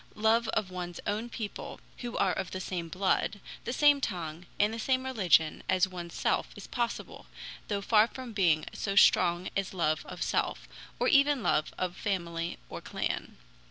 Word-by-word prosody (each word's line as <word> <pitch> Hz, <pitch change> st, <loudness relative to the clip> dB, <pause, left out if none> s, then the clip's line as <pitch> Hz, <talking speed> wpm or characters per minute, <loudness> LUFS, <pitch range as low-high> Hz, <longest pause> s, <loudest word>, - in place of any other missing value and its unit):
Love 220 Hz, +2 st, +3 dB
of 205 Hz, -4 st, -1 dB
one's 175 Hz, -1 st, -5 dB
own 215 Hz, +4 st, -2 dB
people 220 Hz, -3 st, -6 dB, 0.2 s
who 240 Hz, -1 st, -5 dB
are 185 Hz, -, +2 dB
of 190 Hz, -1 st, -3 dB
the 185 Hz, -, -5 dB
same 175 Hz, -2 st, -4 dB
blood, 195 Hz, +3 st, 0 dB, 0.3 s
the -, -, -2 dB
same 290 Hz, +2 st, +5 dB
tongue, 175 Hz, -, -4 dB
and 210 Hz, +2 st, +3 dB
the 230 Hz, -, -4 dB
same 260 Hz, +3 st, +1 dB
religion 185 Hz, -11 st, +3 dB
as 185 Hz, 0 st, +4 dB
one's 175 Hz, -2 st, -7 dB
self -, -, +1 dB
is -, -, -9 dB
possible, 240 Hz, -2 st, -4 dB, 0.4 s
though 200 Hz, -1 st, -1 dB
far 215 Hz, +1 st, +5 dB
from 255 Hz, -2 st, -8 dB
being 170 Hz, -6 st, +3 dB
so 200 Hz, -1 st, -3 dB
strong 175 Hz, -2 st, +5 dB
as 195 Hz, -1 st, -2 dB
love 155 Hz, -3 st, +1 dB
of -, -, -4 dB
self, -, -, -1 dB, 0.3 s
or -, -, +2 dB
even 280 Hz, -4 st, +4 dB
love 150 Hz, -, +1 dB
of 180 Hz, -1 st, -2 dB
family 170 Hz, -4 st, -2 dB
or -, -, -7 dB
clan. -, -, -3 dB
195 Hz, 175 wpm, -30 LUFS, 175-230 Hz, 0.4 s, same